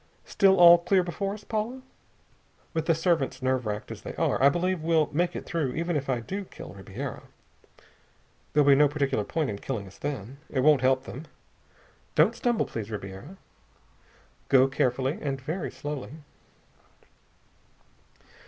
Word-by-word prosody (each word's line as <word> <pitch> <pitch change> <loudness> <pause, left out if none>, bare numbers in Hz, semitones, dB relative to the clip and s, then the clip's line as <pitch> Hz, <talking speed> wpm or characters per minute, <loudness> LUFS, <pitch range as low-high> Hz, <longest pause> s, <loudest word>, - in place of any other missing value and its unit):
Still 195 -1 +4
all 175 0 +9
clear 185 +2 +2
before 195 +3 -3
us, 210 - -12
Paula? 230 +5 -3 0.9
With 160 -1 -2
the 165 - +4
servants 165 -6 0
nerve 130 -2 0
racked 105 0 -4
as - - -8
they - - -7
are, - - 0
I 140 - +7
believe 180 +3 -1
we'll 160 -2 +2
make 175 +3 0
it - - -5
through, 155 -7 -2
even 170 +1 -1
if 140 -2 -2
I 125 -2 0
do 195 - -5
kill - - -11
Ribiera. 100 +7 -7 1.3
There'll 150 -1 +3
be 140 - +8
no 145 +2 +5
particular 140 -6 -1
point 155 +1 -2
in 100 - -6
killing 110 -5 -4
us 95 - -15
then. 135 -2 -5
It 130 - 0
won't 145 -1 +5
help 130 0 +2
them. 140 +6 -8 0.9
Don't - - +4
stumble, 240 -2 0
please, 110 -2 -6
Ribiera.... 105 - -8 1.1
Go 130 0 +6
carefully, 130 +1 0
and 135 -2 -2
very 155 +5 -4
slowly...." 145 -2 -6
145 Hz, 155 wpm, -27 LUFS, 130-175 Hz, 1.3 s, all